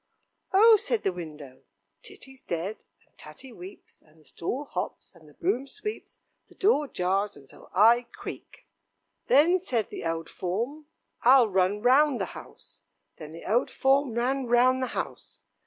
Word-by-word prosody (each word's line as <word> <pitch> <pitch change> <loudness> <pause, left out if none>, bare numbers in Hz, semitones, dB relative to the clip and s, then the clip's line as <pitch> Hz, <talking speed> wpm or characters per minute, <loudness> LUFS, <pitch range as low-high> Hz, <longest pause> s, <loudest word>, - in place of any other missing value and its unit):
"Oh!" 435 +3 +7
said 450 +2 -2
the 185 - 0
window, 150 -6 -10 0.4
"Titty's 265 -1 -12
dead, 180 +5 -5 0.2
and - - -40
Tatty 265 -2 -12
weeps, 185 0 -13
and 155 +1 -26
the 155 - -24
stool 245 - -5
hops, 180 -5 -6
and 160 -4 -19
the 150 - -21
broom 230 +10 -1
sweeps, 425 +9 -8 0.3
the - - -19
door 340 -8 +2
jars, 195 - -1
and 140 -1 -17
so - - -15
I 235 +4 +4
creak." - - -10 0.6
"Then," 340 +6 +5
said 240 - -2
the - - -7
old 165 0 -3
form, 235 - -4 0.3
"I'll 250 -2 +6
run 190 +2 +1
round 270 +2 +4
the - - -1
house." - - -13 0.4
Then 155 -1 -10
the 165 +1 -11
old 230 +5 +1
form 270 -2 +1
ran 255 +2 -1
round 250 +2 +3
the 255 - -1
house. - - -6
235 Hz, 160 wpm, -27 LUFS, 180-275 Hz, 0.6 s, Oh